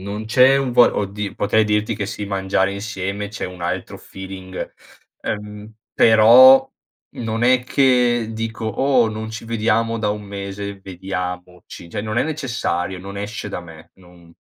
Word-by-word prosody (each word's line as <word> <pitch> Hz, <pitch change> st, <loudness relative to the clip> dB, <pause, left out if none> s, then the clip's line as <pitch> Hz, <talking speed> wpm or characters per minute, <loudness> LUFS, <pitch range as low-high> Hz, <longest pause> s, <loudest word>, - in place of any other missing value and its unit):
non 100 Hz, +3 st, -5 dB
c'è 130 Hz, +4 st, +5 dB
un 135 Hz, -3 st, -1 dB
vo 120 Hz, 0 st, +7 dB
oddi 100 Hz, 0 st, -3 dB
potrei 110 Hz, +2 st, +2 dB
dirti 105 Hz, +1 st, 0 dB
che, 100 Hz, -1 st, -4 dB
sì, 105 Hz, -1 st, -5 dB
mangiare 95 Hz, 0 st, 0 dB
insieme 100 Hz, 0 st, -4 dB
c'è 110 Hz, -, -6 dB
un 90 Hz, -1 st, -8 dB
altro 85 Hz, -, -4 dB
feeling, 95 Hz, -1 st, -8 dB, 0.5 s
ehm, 105 Hz, 0 st, -6 dB, 0.2 s
però 120 Hz, +4 st, +7 dB, 0.5 s
non 115 Hz, 0 st, -3 dB
è 125 Hz, 0 st, +4 dB
che 125 Hz, -3 st, +2 dB
dico: 110 Hz, 0 st, -5 dB
"Oh! 125 Hz, +1 st, +2 dB
Non 110 Hz, 0 st, -5 dB
ci 115 Hz, +1 st, -7 dB
vediamo 115 Hz, 0 st, 0 dB
da 105 Hz, -1 st, -1 dB
un 105 Hz, 0 st, -3 dB
mese, 100 Hz, 0 st, -7 dB
vediamoci." 90 Hz, -2 st, -7 dB
Cioè, -, -, -3 dB
non 110 Hz, +1 st, -4 dB
è -, -, +3 dB
necessario, 120 Hz, -, -3 dB
non 100 Hz, +2 st, -8 dB
esce 105 Hz, +1 st, -5 dB
da -, -, -4 dB
me, 80 Hz, -2 st, -14 dB
non 90 Hz, -2 st, -19 dB
105 Hz, 160 wpm, -20 LUFS, 95-115 Hz, 0.5 s, vo